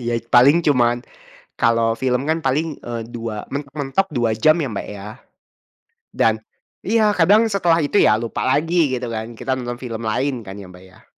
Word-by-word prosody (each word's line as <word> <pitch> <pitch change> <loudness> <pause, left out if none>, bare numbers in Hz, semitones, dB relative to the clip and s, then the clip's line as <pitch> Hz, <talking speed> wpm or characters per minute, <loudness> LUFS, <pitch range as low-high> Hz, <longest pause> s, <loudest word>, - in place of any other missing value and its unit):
Ya 120 - 0 0.2
paling 130 +6 +7
cuman 120 -5 +3 0.6
kalau 115 -1 +2
film 125 -1 0
kan 160 +1 +1
paling, 145 +5 +1 0.2
eee, 120 -1 -4
dua 115 -2 -4 0.2
mentok-mentok 140 +5 -2
2 120 -3 +1
jam 155 0 +6
ya, 140 - -2
Mbak, 105 - -5
ya, 100 0 -9 1.1
dan - - +3 0.5
iya 225 0 +2 0.2
kadang 195 +6 +5
setelah 175 -4 +2
itu 145 - 0
ya - - +5
lupa 115 - -4
lagi, 160 +6 +1 0.2
gitu 125 0 -4
kan, 110 0 -4
kita 135 - -3
nonton 120 -1 -4
film 115 -2 -5
lain 135 +6 0
kan 95 - -7
ya, - - -10
Mbak, 90 0 -15
ya. - - -21
130 Hz, 175 wpm, -20 LUFS, 115-155 Hz, 1.1 s, paling